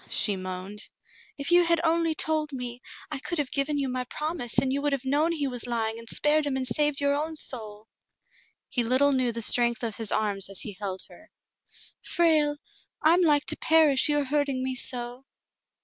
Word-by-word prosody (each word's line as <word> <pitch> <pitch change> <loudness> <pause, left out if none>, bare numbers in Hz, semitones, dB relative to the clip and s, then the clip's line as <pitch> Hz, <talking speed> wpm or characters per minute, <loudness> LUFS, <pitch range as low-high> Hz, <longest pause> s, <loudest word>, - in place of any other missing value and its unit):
she 205 - +2
moaned, 185 +2 -7 0.5
"if 280 +3 -2
you 350 0 +6
had 335 -1 +3
only 330 -1 +1
told 310 -1 0
me, 250 -2 -6 0.3
I 295 - -3
could 345 +5 -3
have 290 -4 -2
given 285 +1 0
you 275 -1 -1
my 255 0 -2
promise 300 -3 -4
and 265 -1 +2
you 280 - -1
would 290 0 0
have 270 -1 -3
known 295 +5 +2
he 300 -4 -1
was 245 -2 -4
lying 225 -1 -1
and 230 0 -8
spared 295 0 +2
him 265 -2 -1
and 260 - -2
saved 295 +1 +1
your 280 0 +1
own 310 +3 -2
soul." 220 -7 -5 0.8
He 245 - -1
little 260 +5 +3
knew 255 -3 +1
the 230 0 -2
strength 235 +1 +3
of 225 -3 -1
his 225 -2 -3
arms 200 -2 0
as 195 - -3
he 210 - -6
held 190 -2 -4
her. 320 - -17 0.7
"Frale! 310 -4 +2 0.5
I 315 +2 +6
am 355 - +3
like 295 -4 +3
to - - +2
perish, 310 -3 +4
you 295 - +2
are 290 - +1
hurting 280 -2 -1
me 260 0 -2
so." 245 0 -3
275 Hz, 205 wpm, -26 LUFS, 235-300 Hz, 0.8 s, you